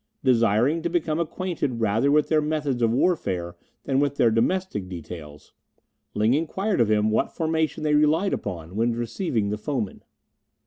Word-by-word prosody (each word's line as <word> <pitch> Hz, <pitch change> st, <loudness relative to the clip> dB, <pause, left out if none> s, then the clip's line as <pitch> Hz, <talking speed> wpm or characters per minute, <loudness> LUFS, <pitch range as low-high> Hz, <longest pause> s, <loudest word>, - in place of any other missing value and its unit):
Desiring 120 Hz, +4 st, +3 dB
to 170 Hz, -, -1 dB
become 165 Hz, -2 st, 0 dB
acquainted 165 Hz, -7 st, -2 dB
rather 115 Hz, +5 st, +2 dB
with 150 Hz, 0 st, +3 dB
their 155 Hz, -1 st, +3 dB
methods 150 Hz, -4 st, -1 dB
of 115 Hz, -, +3 dB
warfare 100 Hz, -, 0 dB, 0.3 s
than 135 Hz, 0 st, +1 dB
with 140 Hz, -1 st, +1 dB
their 115 Hz, -4 st, +3 dB
domestic 115 Hz, -, 0 dB
details, 80 Hz, -4 st, -9 dB, 0.6 s
Ling 110 Hz, +3 st, +3 dB
inquired 175 Hz, -, 0 dB
of 115 Hz, -, +2 dB
him 105 Hz, 0 st, +2 dB
what 110 Hz, -, +1 dB
formation 160 Hz, -1 st, -1 dB
they 150 Hz, -1 st, +1 dB
relied 155 Hz, +6 st, +3 dB
upon 90 Hz, -3 st, -5 dB
when 115 Hz, +2 st, +1 dB
receiving 115 Hz, -, -2 dB
the 105 Hz, -, -3 dB
foemen. 120 Hz, -5 st, -3 dB
130 Hz, 160 wpm, -24 LUFS, 105-155 Hz, 0.6 s, Desiring